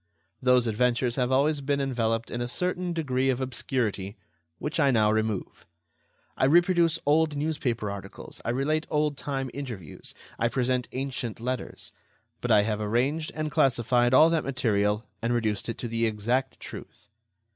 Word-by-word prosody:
Those 125 -1 +4
adventures 120 +2 +1
have 125 -1 +1
always 140 +3 +2
been 140 +1 0
enveloped 115 -4 -1
in 120 - -3
a 120 - -1
certain 180 +5 -2
degree 135 -6 0
of 130 -1 +1
obscurity, 120 -6 -2 0.4
which 155 +3 -3
I 140 -3 +4
now 110 -4 +4
remove. 110 -3 -2 0.7
I - - +2
reproduce 170 +2 +4
old 155 +1 +3
newspaper 125 -8 -1
articles, 100 -1 -9
I - - -3
relate 150 +6 0
old 150 -1 +1
time 135 -2 -3
interviews, 120 - -7 0.2
I 115 - +3
present 125 0 0
ancient 130 -4 -4
letters; 125 +2 -4 0.5
but - - -3
I 105 - +6
have 105 0 -1
arranged 130 +9 0
and 155 0 -2
classified 120 -1 +3
all 155 +5 +7
that 165 -2 +1
material 105 -5 0 0.2
and 115 +1 0
reduced 110 -2 -1
it 115 - -3
to 120 - -4
the 115 0 0
exact 120 +5 -1
truth. - - -10
125 Hz, 155 wpm, -27 LUFS, 115-145 Hz, 0.7 s, all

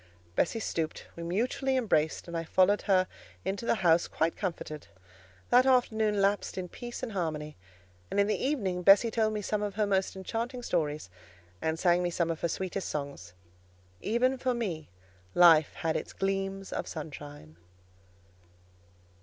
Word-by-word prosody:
Bessie 225 - +1
stooped; 165 -6 -3
we 170 - -8
mutually 245 +9 0
embraced, 160 -12 +1
and 170 - -6
I 165 - -1
followed 185 +5 +3
her 185 -1 +5 0.4
into 195 +4 -3
the - - +3
house 165 0 +5
quite 165 +1 0
comforted. 165 -5 -5 0.6
That 250 +2 +6
afternoon 220 -5 +3
lapsed 200 0 +1
in 180 -1 -4
peace 240 +5 -7
and 245 - -3
harmony; 155 -5 -3 0.5
and - - -1
in 200 - +5
the 210 - -1
evening 200 -11 0
Bessie 200 +5 +6
told 220 -1 +1
me 210 -1 -3
some 210 +1 -1
of 205 -1 -3
her 215 0 +2
most 195 -1 0
enchanting 230 +6 -4
stories, 150 - -1 0.5
and 160 0 0
sang 175 0 +3
me 175 - 0
some 170 -1 0
of 160 - -5
her 170 - 0
sweetest 190 +2 -3
songs. 140 -12 -5 0.7
Even 250 +4 +1
for 255 -1 0
me 180 -10 -3 0.5
life 165 -3 +6
had 160 -1 -1
its - - -4
gleams 195 0 -2
of - - -3
sunshine. 145 - -8
190 Hz, 160 wpm, -30 LUFS, 165-215 Hz, 0.7 s, That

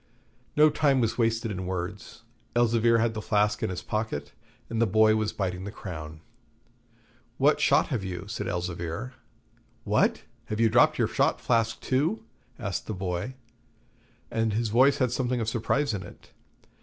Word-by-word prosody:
No 150 +1 +6
time 145 -3 +2
was 115 0 0
wasted 115 -1 +1
in 95 -2 -4
words; 95 +5 -5 0.3
Elzevir 115 -1 +3
had 115 0 +1
the 110 - -4
flask 105 0 +1
in 110 - 0
his 90 -1 -5
pocket, 105 -11 -3 0.4
and 115 0 -2
the 115 - +4
boy 110 +2 +4
was 110 -1 0
biting 90 -2 -3
the 100 - -5
crown. 80 -6 -8 1.2
'What - - +3
shot - - +3
have 115 -7 -2
you?' 90 -1 -5
said 110 +2 -4
Elzevir. 90 +7 -4 0.7
'What! - - +1 0.2
have 110 -3 -4
you 115 -1 +4
dropped 115 +3 +4
your - - +2
shot - - +1
flask 115 -2 +1
too?' 155 +13 0 0.3
asked 100 -7 -4
the 110 - -3
boy. 90 +6 -3 1.0
And 115 -1 0
his 115 +1 0
voice 130 +6 +4
had 130 -3 +1
something 125 -1 -1
of 115 - -2
surprise 115 +5 0
in 100 - -3
it. 90 - -13
110 Hz, 165 wpm, -27 LUFS, 95-120 Hz, 1.2 s, No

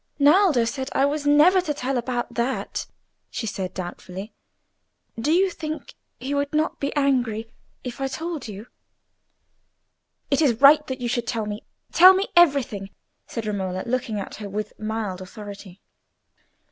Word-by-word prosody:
"Naldo 295 - +5
said 265 +3 -3
I 270 - +3
was 290 +1 -1
never 315 +6 +6
to 300 -4 -3
tell 265 0 -2
about 245 0 -2
that," 245 +2 -2 0.4
she - - -4
said, 195 -4 -3
doubtfully. 185 +3 -7 0.9
"Do 285 +7 0
you 375 +3 +3
think 310 -2 -6 0.3
he 265 +3 -3
would 285 0 -1
not 310 +1 0
be 280 - -1
angry 245 -6 0 0.3
if 250 +1 -6
I 270 - +1
told 320 0 -5
you?" 210 +1 -8 1.7
"It 275 - +3
is 240 -7 +2
right 295 +2 +7
that 260 -1 -5
you 245 - -1
should 240 -1 -1
tell 225 -4 -1
me. 210 0 -5 0.3
Tell 370 +2 +8
me 390 +2 -1
everything," 275 - +3 0.4
said 230 -2 -5
Romola, 190 -3 -2
looking 240 -3 -2
at 195 - -7
her 205 -2 -7
with 210 +1 -4
mild 215 -4 -3
authority. 200 0 -10
250 Hz, 155 wpm, -24 LUFS, 215-290 Hz, 1.7 s, Tell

